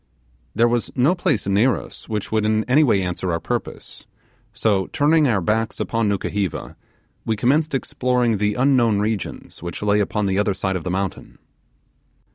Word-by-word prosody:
There 120 Hz, -, +4 dB
was 120 Hz, 0 st, 0 dB
no 135 Hz, +7 st, +3 dB
place 175 Hz, -, 0 dB
near 105 Hz, +6 st, +3 dB
us -, -, -11 dB
which 105 Hz, -2 st, -3 dB
would 110 Hz, -1 st, +1 dB
in 110 Hz, 0 st, +1 dB
any 140 Hz, +7 st, +4 dB
way 100 Hz, -9 st, +2 dB
answer 90 Hz, 0 st, -3 dB
our 85 Hz, -, -1 dB
purpose, -, -, -5 dB, 0.4 s
so 100 Hz, -4 st, 0 dB
turning 150 Hz, +1 st, +3 dB
our 110 Hz, -6 st, +1 dB
backs 110 Hz, +4 st, -1 dB
upon 115 Hz, -2 st, 0 dB
Nukuheva, 100 Hz, -2 st, -3 dB, 0.5 s
we 110 Hz, -, -1 dB
commenced 140 Hz, +7 st, +1 dB
exploring 125 Hz, -3 st, 0 dB
the 105 Hz, 0 st, 0 dB
unknown 125 Hz, -4 st, +3 dB
regions 105 Hz, -2 st, -4 dB
which 85 Hz, +3 st, -6 dB
lay 105 Hz, 0 st, +2 dB
upon 105 Hz, +1 st, 0 dB
the 95 Hz, 0 st, 0 dB
other 105 Hz, -2 st, +1 dB
side 95 Hz, 0 st, -2 dB
of 90 Hz, -, -3 dB
the 90 Hz, -, -3 dB
mountain. 95 Hz, +1 st, -4 dB
110 Hz, 170 wpm, -21 LUFS, 100-125 Hz, 0.5 s, There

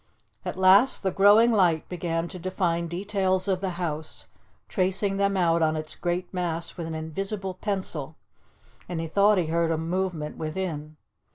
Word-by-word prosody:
At -, -, -5 dB
last 190 Hz, +8 st, +5 dB
the 190 Hz, -, +1 dB
growing 205 Hz, +5 st, +6 dB
light 175 Hz, -7 st, +2 dB
began 170 Hz, -1 st, -2 dB
to 185 Hz, -, -8 dB
define 170 Hz, -2 st, -1 dB
details 190 Hz, +1 st, -1 dB
of 190 Hz, -2 st, 0 dB
the 195 Hz, -, -1 dB
house, 155 Hz, -3 st, -5 dB, 0.4 s
tracing 195 Hz, +1 st, 0 dB
them 200 Hz, 0 st, +1 dB
out 170 Hz, -2 st, +3 dB
on 160 Hz, 0 st, +2 dB
its 155 Hz, 0 st, -2 dB
great 175 Hz, +1 st, -3 dB
mass 170 Hz, -2 st, -3 dB
with 170 Hz, -3 st, -5 dB
an 160 Hz, -, -4 dB
invisible 190 Hz, +5 st, -4 dB
pencil, 185 Hz, -7 st, -4 dB, 0.7 s
and 175 Hz, -2 st, -3 dB
he 165 Hz, -, -2 dB
thought 200 Hz, +5 st, +4 dB
he 180 Hz, -, +2 dB
heard 165 Hz, +1 st, +1 dB
a 165 Hz, -, +1 dB
movement 165 Hz, -2 st, -2 dB
within. 155 Hz, -2 st, -4 dB
180 Hz, 165 wpm, -26 LUFS, 165-195 Hz, 0.7 s, growing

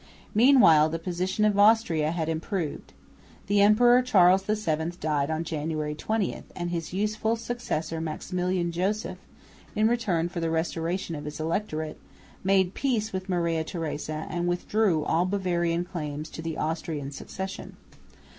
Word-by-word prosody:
Meanwhile 215 Hz, -, +6 dB
the 165 Hz, -, -2 dB
position 185 Hz, +4 st, -1 dB
of 205 Hz, -1 st, +2 dB
Austria 205 Hz, -8 st, +4 dB
had 165 Hz, -1 st, -2 dB
improved. 165 Hz, 0 st, -3 dB, 0.5 s
The 205 Hz, 0 st, +3 dB
Emperor 240 Hz, +4 st, +6 dB
Charles 190 Hz, -6 st, +5 dB
VII 170 Hz, -6 st, -1 dB
died 145 Hz, -2 st, 0 dB
on 160 Hz, +1 st, -1 dB
January 155 Hz, -1 st, -3 dB
20; 215 Hz, +6 st, -2 dB
and 175 Hz, -1 st, -3 dB
his 165 Hz, -2 st, -3 dB
youthful 215 Hz, +4 st, 0 dB
successor 165 Hz, -9 st, -3 dB
Maximilian 180 Hz, +2 st, -2 dB
Joseph, 185 Hz, +1 st, -2 dB, 0.6 s
in 215 Hz, +1 st, +3 dB
return 195 Hz, -8 st, +1 dB
for 175 Hz, 0 st, -5 dB
the 165 Hz, -1 st, -1 dB
restoration 165 Hz, +2 st, -2 dB
of 145 Hz, -1 st, -6 dB
his 150 Hz, +1 st, -6 dB
electorate, 160 Hz, -1 st, -2 dB, 0.4 s
made 190 Hz, -1 st, +3 dB
peace 225 Hz, -6 st, -1 dB
with 185 Hz, 0 st, -4 dB
Maria 170 Hz, -3 st, 0 dB
Theresa 155 Hz, -2 st, -4 dB
and 175 Hz, 0 st, -2 dB
withdrew 175 Hz, -1 st, +1 dB
all 175 Hz, +2 st, +2 dB
Bavarian 175 Hz, -3 st, 0 dB
claims 155 Hz, -4 st, -5 dB
to -, -, -7 dB
the 165 Hz, -1 st, -4 dB
Austrian 155 Hz, -3 st, -3 dB
succession. 190 Hz, +7 st, -7 dB
175 Hz, 140 wpm, -27 LUFS, 160-200 Hz, 0.6 s, Meanwhile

